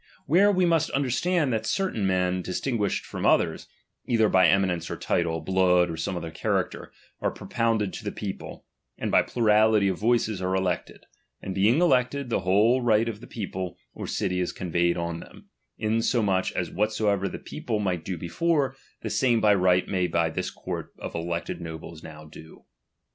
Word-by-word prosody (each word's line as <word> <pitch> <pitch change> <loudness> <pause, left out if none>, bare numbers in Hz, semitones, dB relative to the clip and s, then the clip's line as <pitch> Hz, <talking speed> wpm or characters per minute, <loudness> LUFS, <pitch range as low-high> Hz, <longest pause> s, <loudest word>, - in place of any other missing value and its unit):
Where 190 +8 +5
we 185 -2 +2
must 165 -2 +2
understand 140 +2 +1
that 110 0 -2
certain 150 - 0
men 90 -1 +1
dis 90 - -3
tinguished 115 -7 -1
from - - -6
others, - - +2 0.4
either 110 -3 +3
by 95 -2 +5
eminence 90 -2 +1
of - - -5
title, 80 -1 0
blood, 90 -2 +3
or - - -4
some 85 +3 -3
other 85 -1 -5
character, - - -2 0.3
are - - +1
propounded 115 -4 -1
to - - -7
the 105 - -3
people, 100 -2 -7 0.3
and - - -3
by - - +6
plurality 110 -2 +3
of 95 - -3
voices 110 -3 +1
are 95 +1 0
elected; 95 -2 -2 0.3
and 95 - -5
being 105 - +3
elected, 135 -5 +2
the - - +2
whole 105 +8 +3
right 115 -1 +3
of 110 -1 -5
the - - -11
people 95 -4 -5 0.2
or - - -6
city 90 -3 -1
is 90 - -1
conveyed 85 -1 0
on 85 -1 -3
them, - - -14 0.3
insomuch 110 -3 +1
as 90 -2 -2
whatsoever 105 -1 0
the - - -6
people 115 -3 -4
might 90 -5 -1
do 95 -2 -4
before, 140 - 0 0.3
the - - -3
same 120 -3 +2
by 105 -1 +5
right 90 -2 +3
may 90 -2 0
this 85 -2 -1
court - - -6
of - - -7
elected 85 +1 -3
nobles 80 -1 -8
now 75 0 -11
do. 80 +1 -14
100 Hz, 175 wpm, -26 LUFS, 90-115 Hz, 0.4 s, by